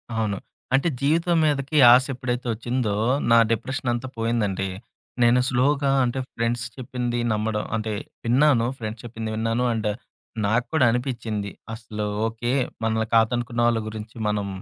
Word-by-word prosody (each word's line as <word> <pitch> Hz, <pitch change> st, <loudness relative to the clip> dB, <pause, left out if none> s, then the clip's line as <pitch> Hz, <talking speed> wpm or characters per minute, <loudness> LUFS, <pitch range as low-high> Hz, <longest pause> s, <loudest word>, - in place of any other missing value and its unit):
అవును. 105 Hz, -3 st, -1 dB, 0.4 s
అంటే 140 Hz, +6 st, +3 dB
జీవితం 165 Hz, +4 st, +2 dB
మీదకి 145 Hz, 0 st, 0 dB, 0.2 s
ఆశ 130 Hz, +1 st, +5 dB
ఎప్పుడైతే 125 Hz, -1 st, -3 dB
ఒచ్చిందో, 120 Hz, -1 st, -1 dB, 0.4 s
నా 115 Hz, -, +7 dB
డిప్రెషన్ 125 Hz, +3 st, -2 dB
అంతా 120 Hz, +2 st, -3 dB
పోయిందండి. 105 Hz, -4 st, 0 dB, 0.5 s
నేను 120 Hz, +1 st, +5 dB
స్లోగా 140 Hz, +2 st, +2 dB
అంటే 125 Hz, +1 st, -1 dB, 0.2 s
ఫ్రెండ్స్ 120 Hz, +1 st, -1 dB
చెప్పింది 120 Hz, -1 st, -3 dB
నమ్మడం 105 Hz, 0 st, -1 dB
అంటే, 110 Hz, -1 st, -2 dB, 0.3 s
విన్నాను. 125 Hz, 0 st, +4 dB
ఫ్రెండ్స్ 110 Hz, -1 st, -6 dB
చెప్పింది 115 Hz, -1 st, -5 dB
విన్నాను. 115 Hz, +2 st, 0 dB
అండ్ 110 Hz, -1 st, -1 dB, 0.6 s
నాకు 115 Hz, +4 st, +1 dB
కూడా 155 Hz, -5 st, +4 dB
అనిపిచింది 115 Hz, -5 st, -3 dB, 0.2 s
అసలు 110 Hz, -2 st, -5 dB, 0.2 s
ఓకే. 115 Hz, +2 st, -3 dB, 0.3 s
మనల్ని 110 Hz, 0 st, 0 dB
కాదనుకున్న 120 Hz, +1 st, +1 dB
వాళ్ళ 115 Hz, -1 st, +2 dB
గురించి 110 Hz, +1 st, -8 dB
మనం 105 Hz, -1 st, -1 dB
120 Hz, 135 wpm, -24 LUFS, 110-125 Hz, 0.6 s, నా